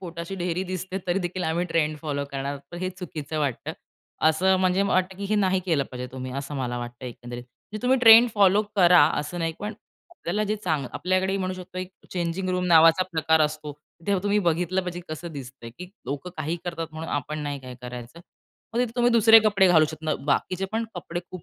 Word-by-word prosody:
पोटाची 170 0 -6
ढेरी 180 +1 -1
दिसते 185 +1 -4
तरी 180 +2 +1
देखील 180 0 -3
आम्ही 170 +2 0
ट्रेंड 155 -2 0
फॉलो 140 -2 -2
करणार 135 0 -3
आहोत 140 -1 -6
पण 175 - -7
हे 185 0 -2
चुकीचं 160 -5 -6
वाटतं. 140 -5 -2 0.6
असं 185 +4 +3
म्हणजे 185 +1 +2
मला 200 - 0
वाटतं, 185 0 +1
की 200 - -5
हे 215 - +3
नाही 190 -2 +2
केलं 155 -6 +2
पाहिजे 125 0 -5
तुम्ही 130 -1 -6
असं 145 +1 -7
मला 120 -2 -2
वाटतं 120 +1 -8
एकंदरीत. 120 0 -8
म्हणजे 125 - -12
तुम्ही 260 +1 +3
ट्रेंड 230 0 +9
फॉलो 200 0 +5
करा, 180 -2 +7 0.2
असं 150 +4 -6
नाही 165 -1 -1
पण 210 +1 -4 0.4
आपल्याला 210 - -2
जे 215 +1 -1
चांग 155 -9 -2
आपल्याकडेही 185 +1 0
म्हणू 185 -1 -2
शकतो 185 0 -9
एक 185 0 -5 0.2
चेंजिंग 180 +1 -2
रूम 180 0 0
नावाचा 165 +1 +6
प्रकार 160 0 +2
असतो. 150 0 -1 0.3
तेव्हा 195 -2 +1
तुम्ही 205 +1 +2
बघितलं 180 0 +1
पाहिजे 180 -1 -5
कसं 160 +2 -6
दिसतं. 130 -4 -9
की 180 0 -8 0.2
लोकं 145 +6 -4
काहीही 155 +2 -2
करतात 165 -2 -4
म्हणून 160 +1 -6
आपण 145 +2 -3
नाही 145 -1 -3
काय 130 -1 -9
करायचं. 125 +5 -8 0.5
मग - - 0
तिथे 245 -2 0
तुम्ही 245 0 +3
दुसरे 225 -1 +8
कपडे 200 -3 +4
घालू 160 -3 +6
शकता. 155 -1 -3
बाकीचे 180 +6 0
पण 225 +1 0
कपडे 175 -1 -5
खूप 185 -3 -8
175 Hz, 205 wpm, -25 LUFS, 150-190 Hz, 0.6 s, ट्रेंड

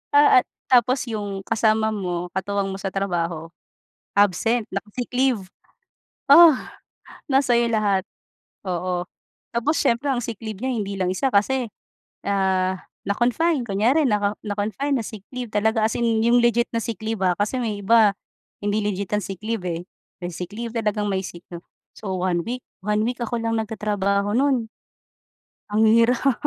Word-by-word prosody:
ah, 290 -3 +7
at - - -5 0.2
tapos 250 +1 +4
yung 205 -4 -4
kasama 220 0 +2
mo 180 -4 -3
katuwang 195 +1 -2
mo 195 - -6
sa 195 - -3
trabaho 170 -4 -2 0.7
absent, 205 +4 +3
naka-sick 240 +5 -5
leave. 250 -5 +1 0.9
Ugh, 325 -1 +9 0.7
nasa 265 -4 +3
'yo 235 - +3
lahat, 200 -3 +1 0.6
oo, 180 -1 -2 0.5
tapos 240 +6 0
siyempre 235 +5 +1
ang 260 -3 0
sick 230 -3 -5
leave 220 -2 -7
niya 260 - 0
hindi 205 -5 -2
lang 185 -1 -1
isa 185 +9 -1
kasi, 250 +2 +2 0.6
ah, 190 -1 +1 0.2
na-confine, 245 +8 +1
kunyari 235 +9 +2
naka 210 -5 +1
na-confine 215 +7 -1
na 220 - -4
sick 215 -4 -9
leave 250 -1 -5
talaga 220 +1 +1
as 225 - -4
in 230 -2 +1
'yong 235 +2 +4
legit 235 0 +3
na 230 - 0
sick 230 -5 -4
leave, 220 -2 -3
ah, 185 - +4
kasi 210 +5 0
may 210 -3 -2
iba 215 +1 +5 0.5
hindi 205 +1 -1
legit 200 -1 -2
ang 210 - -1
sick 195 -3 -6
leave 220 -2 -3
eh. 175 0 -4 0.3
May 175 -1 -6
sick 180 0 -6
leave 230 +2 -6
talagang 210 -2 0
may 190 -1 -1
sick 175 -2 -9
'no 170 0 -9 0.3
so 205 -3 -6
one 180 -2 0
week, 245 +5 -4 0.2
one 210 +2 +1
week 245 0 -3
ako 235 +1 -2
lang 225 0 -1
nagtatrabaho 205 -2 -1
no'n. 260 -3 +2 1.0
Ang 215 +1 +2
hirap. 235 +4 +4
215 Hz, 165 wpm, -23 LUFS, 195-235 Hz, 1.0 s, Ugh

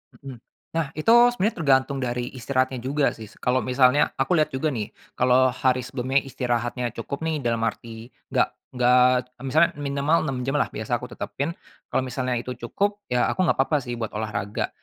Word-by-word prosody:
Mhm. 135 -3 -10 0.4
Nah 165 -3 +1
itu 155 +7 -1 0.2
sebenarnya 220 -1 0
tergantung 135 0 +3
dari 125 -1 -2
istirahatnya 130 +1 0
juga 140 +2 +1
sih 110 - -9
s 105 - -19
kalau 125 +1 +1
misalnya 130 +2 +3
aku 135 +7 +2
lihat 155 - +2
juga 130 +4 0
nih, 110 -5 -4 0.3
kalau 125 +1 +4
hari 130 0 +1
sebelumnya 130 +1 0
istirahatnya 120 -2 -2
cukup 140 +6 -5
nih 160 -2 -1
dalam 115 -1 0
arti 115 +1 -6 0.2
enggak - - +2 0.3
enggak 125 0 +5 0.4
misalnya, 155 +5 +4
minimal 140 +3 +1
6 135 -1 -2
jam 135 +3 0
lah - - +2
biasa - - -3
aku - - -7
tetapin, 155 +5 -4 0.3
kalau 130 - 0
misalnya 130 -1 -2
itu 120 +1 -4 0.2
cukup, 205 - -1
ya 125 0 +2
aku 185 -1 +1
enggak - - +2
apa-apa 135 +3 +2
sih 120 -1 -5
buat 115 -2 -4
olahraga. 105 -2 -3
130 Hz, 180 wpm, -24 LUFS, 120-140 Hz, 0.4 s, enggak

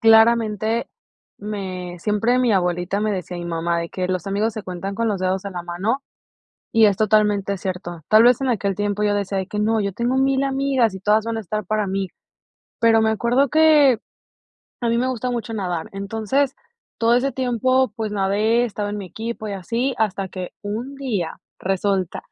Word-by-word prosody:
claramente 225 0 +4 0.5
me 185 -4 -5
siempre 215 +6 +1
mi 245 -3 +3
abuelita 180 +1 0
me 215 0 0
decía 180 -2 -4
mi 175 - -5
mamá 170 0 -1
de 170 - -4
que 185 -1 -3
los 185 -1 -2
amigos 210 +3 0
se 215 - -6
cuentan 185 +1 -5
con 230 +2 0
los 205 -3 -1
dedos 185 0 0
de 200 - -5
la 175 -2 -5
mano 195 +10 -1 0.7
y 225 -1 +6
es 200 -2 +3
totalmente 210 -2 +2
cierto. 180 -2 -5
Tal 215 +1 +7
vez, 245 0 +5
en 265 - 0
aquel 200 -4 0
tiempo 205 +1 -1
yo 205 0 +2
decía 200 -1 -1
de 190 - -4
que 210 0 -4
no, 220 +1 +2
yo 200 0 -1
tengo 240 +5 0
mil 270 0 +2
amigas 270 -5 +1
y 190 - -7
todas 210 +3 +2
van 230 0 -2
a - - -1
estar 210 +1 -4
para 215 +1 0
mí. 190 -1 -2 0.7
Pero, 225 -1 +5
me 220 0 +3
acuerdo 240 +5 +2
que, 300 -6 +5 0.8
a 235 - +1
mí 235 - +2
me 255 - +1
gusta 255 0 -2
mucho 235 -1 -3
nadar. 180 -6 -3
Entonces 225 +8 -1 0.4
todo 230 +1 +4
ese 265 +3 +1
tiempo, 255 -1 +1
pues, 220 -2 -3
nade, 210 +4 +2
estaba 210 -3 -3
en 210 - -4
mi 195 - -6
equipo 220 +2 -5
y 205 - -4
así 230 +8 -1
hasta 200 -3 0
que 185 -1 -6
un 230 +7 -4
día 225 -11 -3 0.2
resulta 190 -1 -1
210 Hz, 195 wpm, -22 LUFS, 195-235 Hz, 0.8 s, Tal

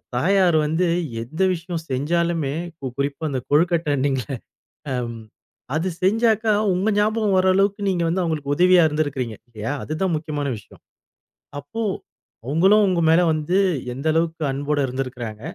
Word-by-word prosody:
தாயார் 180 +5 +3
வந்து 160 +4 +1 0.4
எந்த 145 +10 -6
விஷயம் 170 -1 -5
செஞ்சாலுமே, 160 +2 0 0.4
குறிப்பா 140 +2 -2
அந்தக் 130 -3 -4
கொழுக்கட்டணீங்கள்ல 145 - +1 1.4
அது 165 +4 0
செஞ்சாக்கா 220 +2 +2 0.2
உங்க 190 +4 +1
ஞாபகம் 210 -1 +2
வர்ற 185 0 +4
அளவுக்கு 200 +1 +1
நீங்க 175 -3 0
வந்து 175 +3 0
அவங்களுக்கு 150 -4 -1
உதவியா 180 +2 +5
இருந்திருக்கிறீங்க 145 -7 -2
இல்லையா? 115 +1 -5
அதுதான் 170 +4 -1
முக்கியமான 150 -2 -3
விஷயம். 105 - -16 0.8
அப்போ 145 - -6 0.6
அவங்களும் 190 +10 +4
உங்க 180 -2 +1
மேல 165 +2 +5
வந்து 155 +4 0 0.4
எந்த 135 +5 -4
அளவுக்கு 165 0 0
அன்போட 145 +2 -1
இருந்திருக்கறாங்க, 125 -4 -5
160 Hz, 125 wpm, -22 LUFS, 140-185 Hz, 1.4 s, உதவியா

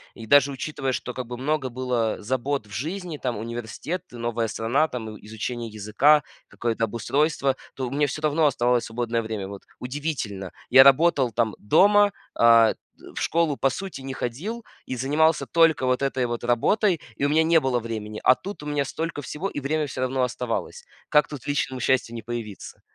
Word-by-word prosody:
И 115 - -9
даже 140 +3 +5
учитывая, 135 0 -3
что 125 0 -4
как 125 -1 -5
бы 120 0 -6
много 140 +1 -1
было 125 -3 -1
забот 130 +3 -2
в - - -18
жизни, 165 - -4
там 125 -5 -3
университет, 120 - -5
новая 120 -1 -2
страна, 120 +8 +1
там 110 -6 -6
и - - -18
изучение 115 +2 -4
языка, 110 +8 +3 0.2
какое-то 115 -1 -1
обустройство, 135 +5 0 0.2
то 130 -2 -3
у - - -7
меня 145 +1 +1
всё 150 +3 -5
равно 155 +1 +2
оставалось 125 -3 +1
свободное 115 0 -2
время. 110 -3 -4
Вот 100 0 -8 0.2
удивительно, 125 - -4 0.2
я 130 - +9
работал 140 -2 +4
там 110 -1 0
дома, 205 - +5 0.2
а 115 -1 +6
т - - -35 0.4
в - - -4
школу 165 -3 +1
по 135 - +2
сути 185 -1 -6
не 135 0 -5
ходил 180 - -4 0.2
и 130 - -4
занимался 150 +5 +2
только 165 -5 +3
вот 130 +1 +1
этой 135 -2 0
вот 120 -1 -4
работой, 170 - +2 0.2
и 140 - -4
у 145 - +3
меня 155 +2 +4
не 165 0 +5
было 130 -3 +1
времени, 110 -2 -5
а 130 - +7
тут 200 +4 -8
у - - -9
меня 145 -1 0
столько 160 +2 -4
всего, 150 +7 -4
и 145 - -5
время 155 +3 0
всё 130 - -5
равно 130 0 0
оставалось. 125 - -3 0.2
Как 150 -1 +4
тут 145 -4 -8
личному 145 -2 -1
счастью 125 -1 +1
не 115 - -5
появиться? 115 -3 -7
130 Hz, 190 wpm, -24 LUFS, 115-150 Hz, 0.4 s, я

